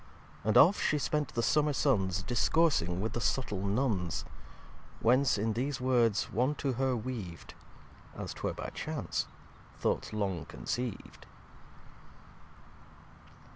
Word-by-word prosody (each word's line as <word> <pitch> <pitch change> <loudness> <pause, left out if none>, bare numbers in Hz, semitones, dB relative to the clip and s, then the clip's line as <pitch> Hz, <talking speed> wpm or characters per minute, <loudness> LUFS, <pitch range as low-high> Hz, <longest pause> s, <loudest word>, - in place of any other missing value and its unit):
And 110 +1 +3
oft 190 +5 +7
She 150 - +2
spent 150 0 0
the 115 - +1
Summer 150 +2 +3
Suns 95 -10 +1
Discoursing 120 - +2
with 110 0 -2
the - - -1
Suttle 105 -4 -1
Nunns. 100 -5 0 0.7
Whence 130 +3 +3
in 110 +2 0
these 130 +4 -2
Words 120 -5 +2
one 125 +7 +1
to 140 -2 -1
her 130 0 0
weav'd, 110 -8 -6 0.6
(As - - -5
'twere - - -3
by - - -5
Chance) - - -3 0.5
Thoughts - - -1
long 95 -6 -2
conceiv'd. 115 - -5
120 Hz, 120 wpm, -31 LUFS, 100-135 Hz, 0.7 s, oft